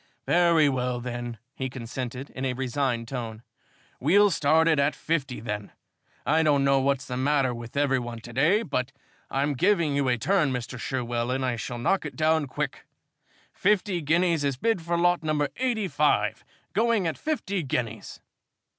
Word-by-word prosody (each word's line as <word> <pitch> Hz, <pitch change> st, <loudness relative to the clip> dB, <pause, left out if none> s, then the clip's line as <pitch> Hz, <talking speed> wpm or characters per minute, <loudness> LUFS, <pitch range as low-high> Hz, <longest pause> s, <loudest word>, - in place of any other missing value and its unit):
"Very 170 Hz, -3 st, +4 dB
well, 125 Hz, -2 st, -1 dB
then," 120 Hz, -1 st, -5 dB, 0.2 s
he 130 Hz, -2 st, -4 dB
consented, 125 Hz, +1 st, -6 dB
in 130 Hz, -, -6 dB
a 130 Hz, -1 st, 0 dB
resigned 125 Hz, -2 st, -1 dB
tone, 115 Hz, -3 st, -5 dB, 0.6 s
"we'll 200 Hz, +9 st, +5 dB
start 160 Hz, +1 st, +3 dB
it 160 Hz, -3 st, +3 dB
at 140 Hz, +2 st, +2 dB
fifty, 140 Hz, -6 st, -2 dB
then. 105 Hz, -2 st, -5 dB, 0.5 s
I 155 Hz, +5 st, +3 dB
don't 145 Hz, -3 st, +3 dB
know 135 Hz, 0 st, +4 dB
what's 135 Hz, 0 st, 0 dB
the 125 Hz, -, -4 dB
matter 135 Hz, -1 st, +2 dB
with 120 Hz, +2 st, -8 dB
every 140 Hz, -2 st, +2 dB
one 120 Hz, -1 st, -6 dB
to 120 Hz, 0 st, -10 dB
day, 165 Hz, -, +3 dB
but 130 Hz, -, -2 dB, 0.4 s
I'm 140 Hz, +2 st, 0 dB
giving 170 Hz, -1 st, +2 dB
you 140 Hz, -1 st, +1 dB
a 125 Hz, -1 st, +2 dB
turn, 170 Hz, -, +2 dB
Mr. 125 Hz, 0 st, -4 dB
Sherwell, 120 Hz, -2 st, -2 dB
and 130 Hz, +1 st, 0 dB
I 125 Hz, -2 st, 0 dB
shall 120 Hz, +1 st, -5 dB
knock 185 Hz, +11 st, +1 dB
it -, -, -6 dB
down 160 Hz, -1 st, +2 dB
quick. 135 Hz, +1 st, -4 dB, 0.7 s
Fifty 200 Hz, -2 st, +1 dB
guineas 165 Hz, +1 st, +2 dB
is 140 Hz, -2 st, 0 dB
bid 225 Hz, -, +1 dB
for 170 Hz, +1 st, -1 dB
lot 175 Hz, +1 st, +3 dB
number 150 Hz, -2 st, 0 dB
85. 215 Hz, -, +1 dB, 0.3 s
Going 225 Hz, -1 st, +2 dB
at 160 Hz, -, -1 dB
fifty 200 Hz, -, -2 dB
guineas!" 120 Hz, -6 st, -4 dB
140 Hz, 170 wpm, -26 LUFS, 125-165 Hz, 0.7 s, we'll